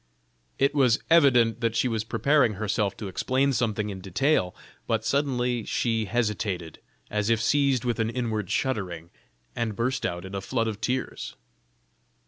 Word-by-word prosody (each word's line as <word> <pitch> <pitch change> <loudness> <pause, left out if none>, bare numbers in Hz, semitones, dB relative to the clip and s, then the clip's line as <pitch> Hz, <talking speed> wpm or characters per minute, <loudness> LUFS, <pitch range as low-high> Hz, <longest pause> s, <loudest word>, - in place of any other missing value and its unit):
It 140 +1 +2
was 130 -5 +4
evident 120 -8 +5
that 115 -1 0
she 125 - +2
was 110 -3 -1
preparing 140 0 +2
herself 105 -1 -1
to 105 - -5
explain 130 +8 +1
something 110 -4 -1
in 95 -1 -7
detail, 95 - +1 0.3
but - - 0
suddenly 125 -4 0
she 115 0 0
hesitated, 105 -6 -2 0.3
as 105 +1 0
if 115 -1 +3
seized 135 +1 +2
with 120 -2 -1
an 110 0 +1
inward 115 -5 -2
shuddering, 95 -9 -2 0.4
and 115 -3 -2
burst 125 +3 -1
out 85 +1 -3
into 100 +1 -4
a - - -8
flood 115 +2 -1
of 110 -1 -4
tears. 130 +3 -3
115 Hz, 155 wpm, -26 LUFS, 105-130 Hz, 0.4 s, evident